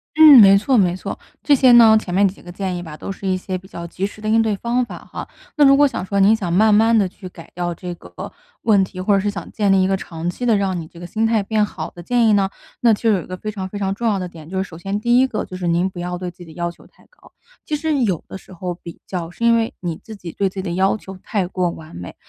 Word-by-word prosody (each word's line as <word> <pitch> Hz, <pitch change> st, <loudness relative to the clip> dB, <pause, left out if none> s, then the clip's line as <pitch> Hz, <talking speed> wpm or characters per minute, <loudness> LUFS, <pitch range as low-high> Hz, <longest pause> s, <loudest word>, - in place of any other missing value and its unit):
嗯， 305 Hz, -4 st, +9 dB
没 195 Hz, -1 st, +8 dB
错 255 Hz, +7 st, +1 dB
没 180 Hz, -4 st, +3 dB
错， 185 Hz, -, -6 dB, 0.2 s
这 290 Hz, -, +5 dB
些 260 Hz, -1 st, +5 dB
呢 230 Hz, -2 st, +8 dB
前 180 Hz, -4 st, -7 dB
面 200 Hz, +2 st, +4 dB
几 190 Hz, -, -8 dB
个 175 Hz, -, -11 dB
建 185 Hz, 0 st, -3 dB
议 175 Hz, -, -4 dB
吧， 160 Hz, -3 st, -9 dB
都 -, -, -6 dB
是 195 Hz, 0 st, -6 dB
一 185 Hz, -1 st, +1 dB
些 185 Hz, 0 st, -5 dB
比 185 Hz, +1 st, -14 dB
较 170 Hz, -3 st, -8 dB
及 180 Hz, +3 st, -4 dB
时 205 Hz, -, -14 dB
的 215 Hz, -, -6 dB
应 225 Hz, +1 st, +4 dB
对 220 Hz, -2 st, 0 dB
方 240 Hz, +4 st, -1 dB
法 -, -, -8 dB
哈。 -, -, -8 dB, 0.3 s
那 295 Hz, -, +5 dB
如 275 Hz, 0 st, +6 dB
果 290 Hz, 0 st, +5 dB
想 265 Hz, -, -4 dB
说， 200 Hz, +1 st, -1 dB
您 200 Hz, +3 st, +5 dB
想 190 Hz, -6 st, -4 dB
慢 210 Hz, +4 st, +4 dB
慢 225 Hz, +2 st, +4 dB
地 200 Hz, -3 st, +2 dB
去 185 Hz, 0 st, -11 dB
改 165 Hz, -2 st, -14 dB
掉 175 Hz, -1 st, -3 dB
这 180 Hz, +1 st, -6 dB
个 -, -, -10 dB, 0.3 s
问 205 Hz, -4 st, +4 dB
题， 185 Hz, 0 st, -7 dB
或 195 Hz, +3 st, +1 dB
者 200 Hz, -, +4 dB
是 205 Hz, +2 st, -1 dB
想 175 Hz, -5 st, -7 dB
建 205 Hz, -3 st, +1 dB
立 190 Hz, -1 st, +4 dB
一 -, -, +2 dB
个 195 Hz, -, +1 dB
长 170 Hz, -3 st, -6 dB
期 180 Hz, +8 st, -4 dB
的 230 Hz, -3 st, +3 dB
让 190 Hz, -3 st, -1 dB
你 160 Hz, -, -9 dB
这 170 Hz, -, -15 dB
个 175 Hz, -, -8 dB
心 220 Hz, +6 st, 0 dB
态 225 Hz, -2 st, +1 dB
变 215 Hz, +1 st, +1 dB
好 170 Hz, -6 st, -5 dB
的 175 Hz, -, -11 dB
建 235 Hz, +5 st, +2 dB
议 215 Hz, -, +4 dB
呢， 195 Hz, -1 st, +2 dB, 0.3 s
那 235 Hz, -, +5 dB
就 225 Hz, +2 st, +1 dB
有 195 Hz, -4 st, +1 dB
一 -, -, -12 dB
个 185 Hz, -, -6 dB
非 215 Hz, +3 st, -5 dB
常 190 Hz, -3 st, -6 dB
非 205 Hz, -, -7 dB
常 195 Hz, -1 st, -1 dB
重 235 Hz, +4 st, -3 dB
要 205 Hz, -, +1 dB
的 185 Hz, -1 st, -4 dB
点 160 Hz, -3 st, -13 dB
就 190 Hz, -, -4 dB
是 190 Hz, -, +1 dB
首 160 Hz, -, -12 dB
先 195 Hz, +3 st, -3 dB
第 240 Hz, +3 st, +3 dB
一 260 Hz, -, +4 dB
个， 235 Hz, -, -3 dB
就 185 Hz, -, -9 dB
是 180 Hz, -1 st, -3 dB
您 170 Hz, +2 st, +2 dB
不 185 Hz, -2 st, -8 dB
要 180 Hz, 0 st, -4 dB
对 180 Hz, 0 st, -5 dB
自 175 Hz, -, -33 dB
己 175 Hz, -, -11 dB
的 165 Hz, -, -13 dB
要 170 Hz, +1 st, -3 dB
求 -, -, -19 dB
太 -, -, -26 dB
高。 -, -, -22 dB, 0.3 s
其 305 Hz, -, -2 dB
实 300 Hz, -1 st, -1 dB
有 190 Hz, -8 st, -1 dB
的 -, -, -8 dB
时 -, -, -19 dB
候 180 Hz, 0 st, -4 dB
比 170 Hz, -1 st, -12 dB
较， 175 Hz, -3 st, -5 dB
是 230 Hz, +7 st, -4 dB
因 235 Hz, 0 st, +5 dB
为 230 Hz, -1 st, 0 dB
你 170 Hz, -3 st, -4 dB
自 220 Hz, -, -10 dB
己 175 Hz, -4 st, -8 dB
对 195 Hz, +2 st, -1 dB
自 190 Hz, -, -22 dB
己 190 Hz, -, -3 dB
的 180 Hz, -, -4 dB
要 190 Hz, +4 st, +1 dB
求 190 Hz, -2 st, -10 dB
太 200 Hz, -4 st, -2 dB
过 180 Hz, 0 st, -1 dB
完 160 Hz, -, -10 dB
美， 90 Hz, +1 st, -8 dB
195 Hz, 340 characters per minute, -20 LUFS, 180-220 Hz, 0.3 s, 嗯